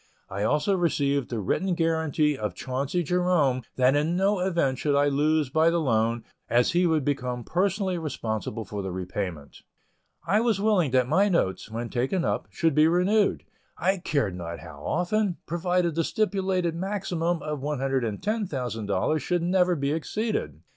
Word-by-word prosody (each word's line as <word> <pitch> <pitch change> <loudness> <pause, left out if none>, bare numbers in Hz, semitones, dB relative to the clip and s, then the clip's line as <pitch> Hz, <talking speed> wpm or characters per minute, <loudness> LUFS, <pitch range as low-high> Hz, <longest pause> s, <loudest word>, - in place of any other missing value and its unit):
I 100 0 -4
also 150 - +2
received 140 -6 0
the 115 - -3
written 180 - 0
guaranty 160 -3 +1
of 105 -7 -4
Chauncey 135 - -2
Jerome 170 -6 +2
that 130 +2 +3
in 155 +4 +1
no 195 +1 +2
event 170 -8 0
should 145 -2 +1
I 145 0 +3
lose 150 0 +1
by 160 +3 +4
the 170 - +1
loan, 115 -4 +1 0.3
as 120 +1 +3
he 175 +1 +3
would 155 -4 +1
become 125 -4 -2
personally 190 - 0
responsible 110 -7 -4
for 100 +1 -5
the 95 -1 -4
repayment. 90 -4 -5 0.6
I 205 +5 +3
was 230 -4 +1
willing 200 -7 +2
that 130 -1 +2
my 195 +8 +3
notes, 110 - 0
when 115 +1 -4
taken 135 - 0
up, - - -1
should 165 -2 +1
be 155 +2 +5
renewed, 190 +5 +2 0.3
I 190 +3 +1
cared 140 - -1
not 85 -1 -6
how 75 -3 -11
often, 180 +2 0
provided 175 0 0
the 165 +2 0
stipulated 190 -3 0
maximum 175 -2 -2
of 150 -1 -3
$110,000 135 - -1
should 175 +2 -1
never 180 0 +3
be 140 -2 -1
exceeded. 160 - -2
155 Hz, 160 wpm, -26 LUFS, 125-180 Hz, 0.6 s, be